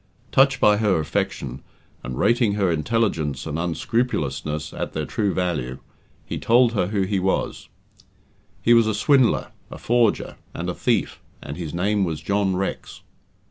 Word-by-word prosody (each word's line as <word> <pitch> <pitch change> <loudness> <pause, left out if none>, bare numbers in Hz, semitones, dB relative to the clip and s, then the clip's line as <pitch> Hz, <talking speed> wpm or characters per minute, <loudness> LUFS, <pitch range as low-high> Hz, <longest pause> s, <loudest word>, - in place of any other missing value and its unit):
Touched 135 0 +4
by 105 0 +5
her 105 -5 +2
affection, 70 -3 -3 0.4
and 60 0 -5
rating 120 -3 +3
her 100 -3 +1
intelligence 80 - -1
and 80 0 -3
unscrupulousness 80 - -2
at - - -4
their 80 -1 -2
true 105 +2 -1
value, 80 -10 -2 0.5
he - - -4
told 120 0 +4
her 100 -5 +1
who 100 -1 0
he 95 +1 0
was. 95 +1 -2 0.9
He 120 - +5
was 115 -2 +5
a 110 - 0
swindler, 130 +2 +3 0.2
a - - -8
forger, 120 -2 +1 0.2
and - - -3
a - - -5
thief, - - -1 0.2
and 70 - -6
his 85 -3 -5
name 100 +4 +1
was 80 -4 -2
John 100 -2 0
Rex. 95 +1 -4
95 Hz, 155 wpm, -23 LUFS, 80-115 Hz, 0.9 s, by